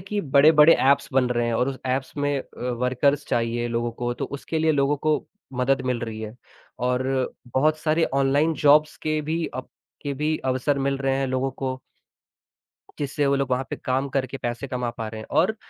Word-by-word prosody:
कि 205 +3 -3
बड़े-बड़े 150 +1 +6
ऐप्स 140 +1 +3
बन 130 -1 +3
रहे 120 -1 +1
हैं 120 - 0
और 125 +3 +1
उस 135 -1 -5
ऐप्स 130 +1 -1
में 145 -1 0
अ, 125 -1 -6
वर्कर्स 130 +4 +1
चाहिए 120 0 -1
लोगों 120 0 -1
को, 120 +1 -3
तो - - -3
उसके 140 +3 -4
लिए 160 0 +3
लोगों 140 0 +2
को 155 +2 0 0.3
मदद 130 +1 +1
मिल 125 -2 0
रही 110 -2 -5
है 110 0 -6 0.5
और 125 0 +1 0.5
बहुत 155 +3 +3
सारे 155 +1 +2
ऑनलाइन 140 +4 +3
जॉब्स 150 +1 +5
के 155 0 0
भी 160 +2 -2
अब 130 0 -6 0.3
के 145 -1 -2
भी 150 +3 0
अवसर 130 +2 +1
मिल 135 0 0
रहे 135 -1 0
हैं 135 - 0
लोगों 130 +1 -1
को। 130 0 -4 1.2
जिससे 145 0 -1
वो 140 - +3
लोग 140 -1 -1
वहाँ 125 +1 +1
पे - - -3
काम 130 +2 -1
करके 135 0 -2
पैसे 120 +3 -4
कमा 125 -2 -2
पा 115 - -3
रहे 110 0 -7
हैं - - -11
और 205 +6 0
135 Hz, 205 wpm, -24 LUFS, 125-145 Hz, 1.2 s, बड़े-बड़े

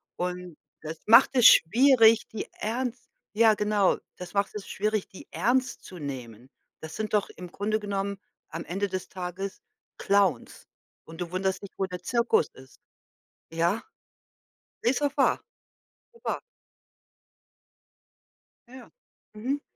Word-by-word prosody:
Und 180 -2 -4 0.2
das 160 +1 -6
macht 230 +4 +7
es 245 -3 +5
schwierig, 230 +3 +6
die 220 - -6
ernst 245 +2 -4 0.3
ja, 220 +1 +5
genau. 210 -2 +2 0.2
Das 180 -1 -9
macht 200 0 0
es 205 - -6
schwierig, 215 0 -1
die 190 - -13
ernst 255 +2 0
zu 180 - -10
nehmen. 125 -4 -7 0.3
Das 160 0 -8
sind 215 0 -4
doch 210 -2 +2
im 180 -1 -10
Grunde 215 +3 -1
genommen 200 -1 -3 0.3
am 165 +2 -6
Ende 195 +3 -2
des 185 0 -4
Tages 185 +1 -6 0.4
Clowns. 195 -10 +1 0.4
Und 165 +2 -10
du 175 -1 -4
wunderst 190 +1 -1
dich, 200 - -7
wo 190 - 0
der 180 -1 -8
Zirkus 235 -7 +2
ist. 130 -1 -16 0.7
Ja. 170 +6 +1 1.0
Ist 245 +3 +2
doch 285 -1 0
wahr. - - +2 0.7
Doch 465 - -22
wahr. - - -1 2.3
Ja, 245 - -17
ja. 255 -2 -13 0.4
Mhm. 255 +7 -2
200 Hz, 135 wpm, -27 LUFS, 180-220 Hz, 2.3 s, macht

